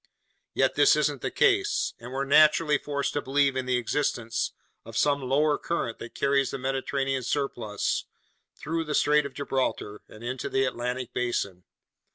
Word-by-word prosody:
Yet - - +2
this - - +5
isn't - - 0
the - - -1
case, 400 +1 +2
and 120 +2 -9
we're 135 +1 -2
naturally 150 +1 +5
forced 140 -1 -2
to 145 - -1
believe 140 0 +2
in 130 -1 -2
the 125 -1 +2
existence 120 -2 -1 0.3
of 115 - -7
some 145 -1 +2
lower 145 +3 +2
current 120 -9 -3
that 115 - -9
carries 140 -1 +2
the - - -4
Mediterranean's 135 0 -2
surplus 120 -8 -1 0.5
through 165 +2 -3
the 150 -1 -2
Strait 150 0 +3
of 130 - -16
Gibraltar 130 -6 -2
and 110 - -13
into 130 +1 -4
the 135 0 +1
Atlantic 125 0 -3
basin. 100 -7 -2
135 Hz, 165 wpm, -27 LUFS, 125-145 Hz, 0.5 s, this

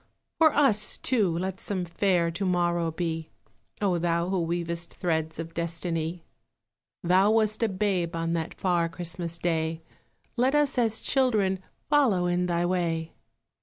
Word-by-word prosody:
For 320 -1 +6
us, 220 -8 +3
too, 220 -8 +1
let 190 +1 -3
some 185 -3 -2
fair 170 0 +1
To 170 +4 -4
morrow 175 -2 +1
be, 160 -1 -3 0.5
O 180 -4 +2
Thou 170 +1 0
who 190 -2 0
weavest 170 0 -2
threads 160 -3 -1
Of 165 +1 -6
Destiny! 170 0 -3 0.8
Thou 185 +3 +4
wast 215 0 +2
a 230 - +2
babe 185 -4 -1
on 165 0 -1
that 165 -1 -3
Far 175 -3 +1
Christmas 170 0 -4
Day, 160 -1 -1 0.5
Let 255 +4 +2
us 290 -3 +2
as 225 -2 +1
children 215 -8 +2 0.3
follow 255 -12 +3
In 175 0 +1
Thy 175 0 0
way. 170 -3 -1
175 Hz, 145 wpm, -27 LUFS, 170-200 Hz, 0.8 s, For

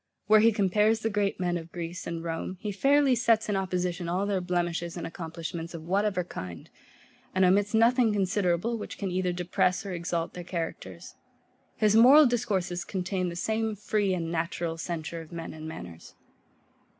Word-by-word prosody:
Where 215 +2 +6
he 225 +2 +6
compares 210 +2 +2
the 225 - -1
great 200 -2 0
men 175 -1 0
of 165 0 -9
Greece 175 +1 -6
and 165 -1 -4
Rome, 165 +2 -4
he 210 - -3
fairly 275 +6 +3
sets 230 -2 +2
in 205 - +1
opposition 180 -2 -2
all 185 +3 0
their 200 -2 0
blemishes 175 -1 -2
and 170 - -4
accomplishments 165 0 -6
of 160 - -7
whatever 190 +1 0
kind, 90 - -8 0.6
and 185 0 +4
omits 205 +4 +3
nothing 235 +1 +4
considerable, 200 +2 0
which - - -7
can 195 -3 -3
either 180 0 0
depress 180 +2 0
or 195 - -4
exalt 170 -1 -2
their 175 - -7
characters. 165 - -6 0.6
His 215 -1 +3
moral 265 +7 +8
discourses 195 -8 0
contain 185 -1 -2
the 170 - -6
same 220 +3 -1
free 205 -1 0
and 165 -2 -3
natural 165 0 -2
censure 165 0 -5
of 160 - -13
men 165 -1 -6
and 155 0 -8
manners. 90 - -9
180 Hz, 175 wpm, -28 LUFS, 170-210 Hz, 0.6 s, moral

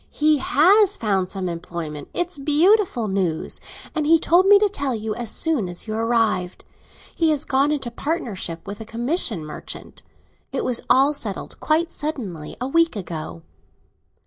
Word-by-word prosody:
"He 305 -1 +2
has 395 +9 +4
found 195 -4 0
some 190 -2 -3
employment! 165 -3 -6
It's 350 -3 -2
beautiful 310 - +3
news, 185 -5 -1 0.3
and 305 -1 -1
he 330 +1 +6
told 350 +4 +3
me 410 0 +8
to 415 +1 +3
tell 280 - -1
you 215 0 -3
as 235 0 -3
soon 270 - 0
as 175 - -5
you 215 - -3
arrived. 225 -5 0 0.5
He 325 -1 +2
has 300 -1 0
gone 275 +2 +2
into 270 -5 -2
partnership 225 - -4
with 205 +2 -7
a - - -6
commission 230 - -2
merchant. 150 - -8 0.5
It - - -2
was 245 -2 0
all 270 +3 +5
settled, 215 -9 -5
quite 325 +2 +1
suddenly, 210 - -5
a 250 - -2
week 330 +1 +2
ago." 160 - -6
245 Hz, 160 wpm, -22 LUFS, 190-315 Hz, 0.5 s, me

